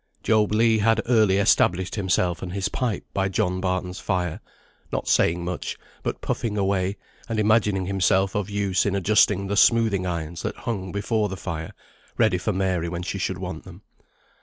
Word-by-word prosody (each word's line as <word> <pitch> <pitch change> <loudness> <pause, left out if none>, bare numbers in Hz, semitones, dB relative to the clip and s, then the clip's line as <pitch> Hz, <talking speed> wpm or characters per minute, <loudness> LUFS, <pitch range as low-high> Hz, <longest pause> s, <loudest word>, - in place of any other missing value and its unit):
Job 110 -2 +2
Legh 110 +1 +3
had 115 +2 +3
early 110 -5 +3
established 95 -2 +2
himself 90 -3 0
and 90 -1 -5
his 100 0 -1
pipe 115 -1 -2
by 95 0 0
John 95 -2 -1
Barton's 90 0 -2
fire, 90 -3 -2 0.5
not - - -3
saying 85 +1 +2
much, 90 0 -4 0.2
but - - -4
puffing 110 -3 -2
away, 95 0 0 0.3
and 115 -1 -1
imagining 105 -3 +2
himself 95 0 +2
of 105 -1 -2
use 100 -2 +1
in 100 - 0
adjusting 100 0 +3
the 100 +1 -2
smoothing 105 -4 +3
irons 85 0 -4
that - - -3
hung 95 -5 -4
before 105 +1 0
the 95 - -5
fire, 80 -3 -5 0.4
ready 90 - +3
for 100 +4 -1
Mary 95 -3 -1
when 85 0 -4
she - - -4
should - - -2
want - - -6
them. - - -13
95 Hz, 175 wpm, -24 LUFS, 90-105 Hz, 0.5 s, Legh